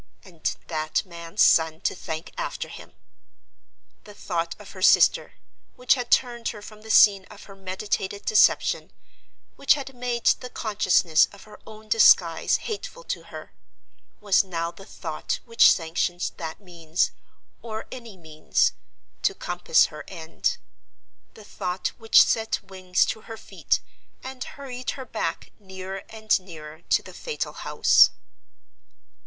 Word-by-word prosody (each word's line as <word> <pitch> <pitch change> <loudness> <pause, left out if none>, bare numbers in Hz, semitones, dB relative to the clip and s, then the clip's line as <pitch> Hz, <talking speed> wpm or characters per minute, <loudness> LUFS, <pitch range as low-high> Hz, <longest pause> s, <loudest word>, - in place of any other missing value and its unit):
—and 170 -5 -4
that 155 +3 -2
man's 170 +2 -1
son 160 -1 +4
to - - -1
thank 160 -2 -7
after - - -4
him! - - -12 1.1
The 210 - -13
thought 170 -3 -3
of 210 - -12
her 185 - -11
sister, - - +4 0.4
which 250 - +3
had 245 -2 -4
turned 240 -2 +1
her 210 - -5
from 215 0 -12
the 220 - -13
scene 200 -3 +6
of 210 +1 -14
her 195 - -13
meditated 195 +1 -4
deception, 215 - +3 0.7
which 280 - +4
had 270 -2 -7
made 245 -1 -4
the 250 - +2
consciousness 185 -8 +2
of 200 - -14
her 215 - -15
own 215 0 -12
disguise 180 -7 +5
hateful - - -6
to - - -11
her, - - -10 0.7
was 200 -2 +3
now 170 -3 -3
the 195 +2 -15
thought 160 -3 -4
which 230 -1 +6
sanctioned 175 +1 -1
that 160 -1 -6
means, 170 -3 -2 0.5
or 220 -1 -6
any 235 -6 -9
means, 155 -2 0 0.5
to 395 - +1
compass 175 - +2
her 150 - -8
end; 170 - -3 0.8
the 215 - -13
thought 180 -2 -3
which 225 -1 +6
set 225 0 0
wings 185 -1 0
to 220 - -4
her 225 +1 -9
feet, - - -2 0.4
and 260 -1 -6
hurried 255 -3 -6
her 265 - -7
back - - -4
nearer 190 -1 -7
and 220 -2 +1
nearer 160 -4 -11
to - - +3
the - - -12
fatal 475 -2 -5
house. - - +5
195 Hz, 145 wpm, -25 LUFS, 170-225 Hz, 1.1 s, scene